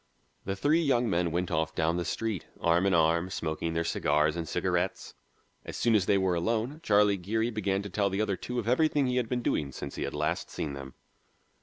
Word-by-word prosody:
The 95 Hz, -, -2 dB
three 150 Hz, -, +2 dB
young 125 Hz, -6 st, +2 dB
men 85 Hz, 0 st, +1 dB
went 90 Hz, +2 st, -2 dB
off 80 Hz, -1 st, -1 dB
down 80 Hz, +1 st, +1 dB
the 90 Hz, -, -2 dB
street, 110 Hz, +1 st, -3 dB
arm 85 Hz, +3 st, +3 dB
in 95 Hz, -, +2 dB
arm, 85 Hz, +2 st, +2 dB
smoking 80 Hz, -1 st, -3 dB
their 85 Hz, -, +1 dB
cigars 75 Hz, -1 st, +1 dB
and 85 Hz, -2 st, -4 dB
cigarettes. -, -, -1 dB, 0.5 s
As -, -, -7 dB
soon 120 Hz, -, +2 dB
as 100 Hz, -4 st, +3 dB
they 100 Hz, -, +4 dB
were 95 Hz, -2 st, +1 dB
alone, 115 Hz, -, -1 dB
Charlie 105 Hz, -6 st, +3 dB
Geary 110 Hz, +6 st, -1 dB
began 100 Hz, -3 st, -1 dB
to 100 Hz, -, -6 dB
tell 100 Hz, +1 st, +1 dB
the 95 Hz, +1 st, -2 dB
other 105 Hz, -2 st, +1 dB
two 125 Hz, +6 st, -6 dB
of 115 Hz, -3 st, -2 dB
everything 145 Hz, +3 st, +3 dB
he 125 Hz, 0 st, 0 dB
had 120 Hz, -3 st, 0 dB
been 125 Hz, -1 st, -1 dB
doing 70 Hz, -2 st, 0 dB
since 70 Hz, +1 st, -7 dB
he -, -, -4 dB
had -, -, -3 dB
last 75 Hz, +1 st, -1 dB
seen 75 Hz, -, -4 dB
them. 70 Hz, -1 st, -8 dB
95 Hz, 220 wpm, -29 LUFS, 85-115 Hz, 0.5 s, they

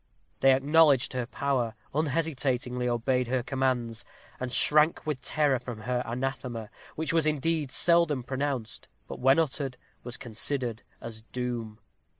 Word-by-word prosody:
They 135 Hz, 0 st, +6 dB
acknowledged 145 Hz, -1 st, +4 dB
her 125 Hz, -2 st, -2 dB
power, 125 Hz, -4 st, -1 dB, 0.2 s
unhesitatingly 135 Hz, -5 st, -1 dB
obeyed 125 Hz, +1 st, 0 dB
her 125 Hz, 0 st, 0 dB
commands, 125 Hz, -3 st, -1 dB, 0.4 s
and 130 Hz, -1 st, -4 dB
shrank 150 Hz, +5 st, +3 dB
with 150 Hz, -4 st, -3 dB
terror 145 Hz, -2 st, +1 dB
from 120 Hz, -3 st, -8 dB
her 125 Hz, +1 st, -1 dB
anathema, 120 Hz, -2 st, -4 dB, 0.2 s
which 160 Hz, +1 st, -2 dB
was 165 Hz, -2 st, +3 dB
indeed 155 Hz, 0 st, 0 dB
seldom 170 Hz, -6 st, +4 dB
pronounced; 130 Hz, -3 st, -3 dB, 0.2 s
but -, -, -7 dB
when 135 Hz, +3 st, +4 dB
uttered, 140 Hz, -4 st, -1 dB, 0.3 s
was 120 Hz, 0 st, -6 dB
considered 120 Hz, 0 st, -1 dB, 0.2 s
as 110 Hz, -1 st, -8 dB
doom. 120 Hz, -3 st, -4 dB
130 Hz, 135 wpm, -28 LUFS, 120-145 Hz, 0.4 s, They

